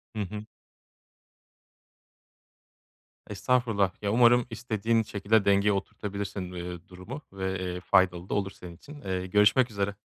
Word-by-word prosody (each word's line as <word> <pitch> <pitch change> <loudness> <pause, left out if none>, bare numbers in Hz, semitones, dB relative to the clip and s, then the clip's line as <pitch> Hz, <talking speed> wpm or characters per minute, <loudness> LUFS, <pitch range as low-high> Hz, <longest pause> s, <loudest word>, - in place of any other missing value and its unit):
Hı 105 - -2
hı. 105 +2 -5 2.8
Estağfurullah, 105 -2 +1
ya, 100 - 0
umarım 120 +1 +5
istediğin 115 0 0
şekilde 105 0 +1
dengeye 100 +1 +4
oturtabilirsin, 100 -2 -4
iii, 90 0 -7
durumu 95 +10 -9
ve, 95 -1 -3
eee, 90 -1 -3
faydalı 90 -1 +2
da - - -2
olur 100 -1 -1
senin 90 -2 -11
için. 145 - -13
Eee, 95 -1 -3
görüşmek 105 +6 +4
üzere. 100 -1 -2
100 Hz, 125 wpm, -28 LUFS, 95-110 Hz, 2.8 s, umarım